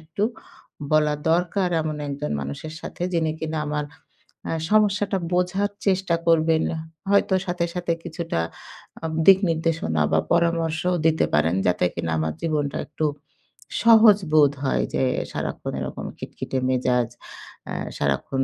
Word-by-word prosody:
একটু 155 Hz, +5 st, -5 dB, 0.7 s
বলা 150 Hz, -1 st, +4 dB, 0.2 s
দরকার 180 Hz, +2 st, +1 dB
এমন 155 Hz, -1 st, -3 dB
একজন 145 Hz, +1 st, -4 dB
মানুষের 70 Hz, -, -6 dB
সাথে, -, -, -7 dB
যিনি 160 Hz, -2 st, +1 dB
কিনা 160 Hz, 0 st, -2 dB
আমার 150 Hz, 0 st, -1 dB, 0.9 s
সমস্যাটা 205 Hz, -2 st, +3 dB, 0.2 s
বোঝার 190 Hz, +3 st, +1 dB, 0.2 s
চেষ্টা 190 Hz, -3 st, +2 dB
করবেন। 160 Hz, -1 st, +4 dB, 0.5 s
হয়তো 200 Hz, -1 st, +3 dB
সাথে, 175 Hz, -1 st, 0 dB
সাথে 175 Hz, -1 st, 0 dB
কিছুটা 170 Hz, -, -3 dB, 0.6 s
আম 160 Hz, -1 st, -3 dB
দিক 190 Hz, +1 st, +8 dB
নির্দেশনা 160 Hz, -, 0 dB
বা, 80 Hz, -, +4 dB
পরামর্শও 170 Hz, +1 st, +1 dB
দিতে 160 Hz, -1 st, +3 dB
পারেন। 80 Hz, +3 st, +3 dB
যাতে 90 Hz, 0 st, +2 dB
কিনা 80 Hz, -, -2 dB
আমার 80 Hz, 0 st, -1 dB
জীবনটা 150 Hz, -4 st, -1 dB
একটু 155 Hz, +1 st, -2 dB, 0.8 s
সহজ 220 Hz, -3 st, +8 dB, 0.2 s
বোধ 145 Hz, -2 st, +6 dB
হয় -, -, +1 dB
যে, -, -, +1 dB, 0.3 s
সারাক্ষণ -, -, -4 dB
এরকম -, -, -5 dB
খিটখিটে 130 Hz, -, -4 dB
মেজাজ, 125 Hz, -2 st, +1 dB, 0.6 s
এ -, -, -3 dB, 0.2 s
সারাক্ষণ 135 Hz, 0 st, 0 dB
160 Hz, 130 wpm, -24 LUFS, 145-180 Hz, 0.9 s, দিক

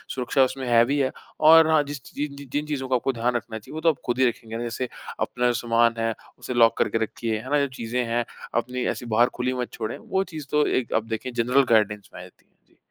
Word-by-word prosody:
सुरक्षा 130 Hz, +1 st, +2 dB
उसमें 130 Hz, 0 st, -2 dB
हेवी 120 Hz, +4 st, +4 dB
है। 130 Hz, -1 st, +1 dB, 0.3 s
और 160 Hz, +1 st, +8 dB
हाँ, 155 Hz, -2 st, +4 dB
जिस 145 Hz, -1 st, -7 dB
च -, -, -13 dB
जिन 145 Hz, -1 st, -3 dB
जि 140 Hz, 0 st, -10 dB
जिन 150 Hz, +1 st, 0 dB
चीज़ों 140 Hz, -3 st, -3 dB
का 130 Hz, -, +3 dB
आपको 130 Hz, +2 st, 0 dB
ध्यान 120 Hz, +1 st, 0 dB
रखना 115 Hz, -2 st, -4 dB
चाहिए, 105 Hz, -, -13 dB
वो 160 Hz, -, -4 dB
तो 165 Hz, -, +4 dB
आप 160 Hz, -, +1 dB
ख़ुद 120 Hz, +1 st, 0 dB
ही 130 Hz, -, +5 dB
रखेंगे 115 Hz, 0 st, -8 dB
ना, 120 Hz, -, -4 dB
जैसे 120 Hz, +1 st, -3 dB, 0.3 s
अपना 125 Hz, 0 st, -1 dB
जो 120 Hz, -, +2 dB
सामान 115 Hz, -1 st, +2 dB
है, 115 Hz, 0 st, 0 dB, 0.3 s
उसे -, -, -5 dB
लॉक 115 Hz, -2 st, +4 dB
करके -, -, +1 dB
रखिए, 110 Hz, 0 st, -3 dB
है 130 Hz, +4 st, -9 dB
ना? 145 Hz, -, +4 dB
जब -, -, -6 dB
चीज़ें 120 Hz, +1 st, -2 dB
हैं 120 Hz, +1 st, -1 dB, 0.3 s
अपनी 125 Hz, +1 st, -1 dB
ऐसी 120 Hz, -, -8 dB
बाहर 120 Hz, +2 st, +5 dB
खुली 125 Hz, +1 st, -1 dB
मत 125 Hz, -1 st, -3 dB
छोड़ें। 110 Hz, -2 st, -4 dB
वो 190 Hz, 0 st, -1 dB
चीज़ 155 Hz, -3 st, -6 dB
तो 150 Hz, 0 st, +3 dB
एक 130 Hz, -, -1 dB
अब 115 Hz, -, 0 dB
देखें 115 Hz, +3 st, -3 dB
जनरल 125 Hz, +4 st, +3 dB
गाइडेंस 105 Hz, -2 st, +2 dB
में -, -, -9 dB
आ -, -, -9 dB
जाती -, -, -17 dB
हैं। -, -, -41 dB, 0.2 s
जी। -, -, -31 dB
125 Hz, 265 wpm, -24 LUFS, 115-140 Hz, 0.3 s, और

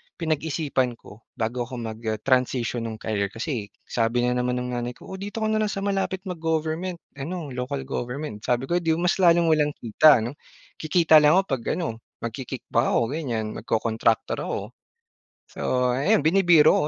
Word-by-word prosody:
pinag-isipan 155 Hz, -5 st, -1 dB
ko 110 Hz, -1 st, -16 dB
bago 120 Hz, +2 st, -2 dB
ako 125 Hz, -, -7 dB
mag, 110 Hz, -2 st, -5 dB
ah, 110 Hz, -, +1 dB
transition 125 Hz, -2 st, +1 dB
nung 110 Hz, -, -5 dB
career. 105 Hz, -2 st, -2 dB
Kasi 115 Hz, +1 st, -4 dB, 0.2 s
sabi 120 Hz, +1 st, 0 dB
na 125 Hz, -, +2 dB
naman 125 Hz, 0 st, 0 dB
ng 125 Hz, 0 st, -3 dB
nanay 120 Hz, 0 st, -3 dB
ko -, -, -13 dB
"O 190 Hz, -, -6 dB
dito 205 Hz, +3 st, -4 dB
ka -, -, +2 dB
na 215 Hz, -, +2 dB
lang 215 Hz, -, +1 dB
sa 195 Hz, -, -4 dB
malapit 195 Hz, -1 st, -1 dB
mag-government 165 Hz, 0 st, -2 dB, 0.2 s
ano, 160 Hz, +1 st, -5 dB
local 130 Hz, +2 st, -3 dB
government." 130 Hz, -1 st, -4 dB
sabi 120 Hz, +4 st, 0 dB
ko, 170 Hz, +6 st, +1 dB
"Edi 165 Hz, -2 st, +1 dB
mas 175 Hz, +3 st, +1 dB
lalong 170 Hz, -2 st, +5 dB
walang 150 Hz, -2 st, +2 dB
kita." 120 Hz, +2 st, +5 dB
'no. 120 Hz, -, -3 dB, 0.5 s
Kikita 160 Hz, 0 st, +5 dB
lang 150 Hz, +2 st, +5 dB
ako 190 Hz, -, +4 dB
'pag 130 Hz, -4 st, -1 dB
ano 155 Hz, -11 st, -3 dB, 0.2 s
magki-kick 125 Hz, +2 st, -5 dB
back 115 Hz, +3 st, +3 dB
ako -, -, +4 dB
ganiyan, 125 Hz, -8 st, -2 dB
magko-kontraktor 115 Hz, 0 st, 0 dB
ako. -, -, -2 dB, 0.9 s
So 125 Hz, -1 st, 0 dB
ayan 135 Hz, +3 st, +2 dB
binibiro 165 Hz, -3 st, +5 dB
135 Hz, 175 wpm, -25 LUFS, 120-165 Hz, 0.9 s, lalong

